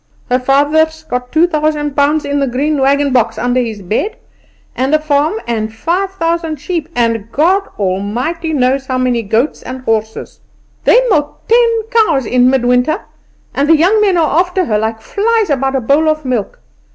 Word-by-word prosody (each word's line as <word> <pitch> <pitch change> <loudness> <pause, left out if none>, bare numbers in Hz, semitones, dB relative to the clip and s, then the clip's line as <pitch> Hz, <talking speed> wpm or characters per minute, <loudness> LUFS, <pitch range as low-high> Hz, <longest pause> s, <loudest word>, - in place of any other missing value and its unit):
"Her 250 - +3
father's 305 +4 +1
got 250 -4 -4
two 325 +2 +4
thousand 305 -3 -1
pounds 295 +2 +1
in 285 0 -1
the 275 - 0
green 280 +4 -1
wagon 280 0 +2
box 230 -3 +1
under 245 +2 0
his 220 -4 -5
bed, 390 - -2 0.6
and 265 +4 +1
a - - +2
farm, 300 -1 0
and 220 -2 -2
five 340 - -1
thousand 330 -3 -1
sheep, 325 +2 -4
and 230 -2 -1
God 370 +9 +1
Almighty 225 - -2
knows 265 -1 0
how 255 - -1
many 250 -2 0
goats 225 +7 -1
and 260 0 -7
horses. 220 -2 -3 0.5
They - - +6
milk 295 -5 -1
ten 460 -1 +3
cows 375 - +2
in 250 +2 +3
mid 260 -2 +1
winter, 250 - +1 0.5
and 285 +2 0
the 325 - +6
young 385 +7 +3
men 390 -4 +2
are 320 -1 +2
after 360 +1 0
her 210 -5 0
like 220 +1 -3
flies 430 - 0
about 270 -1 0
a 265 - 0
bowl 285 +6 +2
of 310 -1 -2
milk. 245 -6 -2
285 Hz, 180 wpm, -14 LUFS, 245-320 Hz, 0.6 s, They